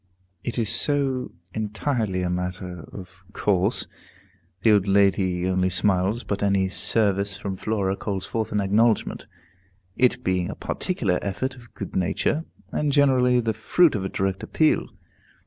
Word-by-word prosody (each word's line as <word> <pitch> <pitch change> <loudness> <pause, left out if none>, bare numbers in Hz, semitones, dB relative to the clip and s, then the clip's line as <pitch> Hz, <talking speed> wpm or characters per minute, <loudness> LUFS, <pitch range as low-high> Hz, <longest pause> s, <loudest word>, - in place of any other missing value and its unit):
It 120 - -4
is 115 -3 +1
so 135 -2 +1 0.2
entirely 110 -3 -1
a 90 - -1
matter 90 -1 -4
of 95 -1 -11
course, 100 +2 +1 0.8
the 110 - +6
old 100 -2 +3
lady 95 -2 +2
only 95 0 +1
smiles, 95 +4 +1
but 100 - -3
any 100 -2 +2
service 100 -1 0
from 95 -1 -4
Flora 100 -1 -1
calls 100 -2 -3
forth 110 -1 -3
an 105 - +1
acknowledgment; 110 +3 +1 0.7
it 125 0 +2
being 90 -1 0
a - - -5
particular 110 - -1
effort 105 +7 -2
of 120 -2 -17
good - - -7
nature, 120 - 0 0.3
and 150 -1 0
generally 130 -3 +4
the 115 -2 0
fruit 150 +9 +3
of 100 - -2
a 95 - -2
direct 95 0 -1
appeal. 155 -1 +1
100 Hz, 145 wpm, -24 LUFS, 95-120 Hz, 0.8 s, the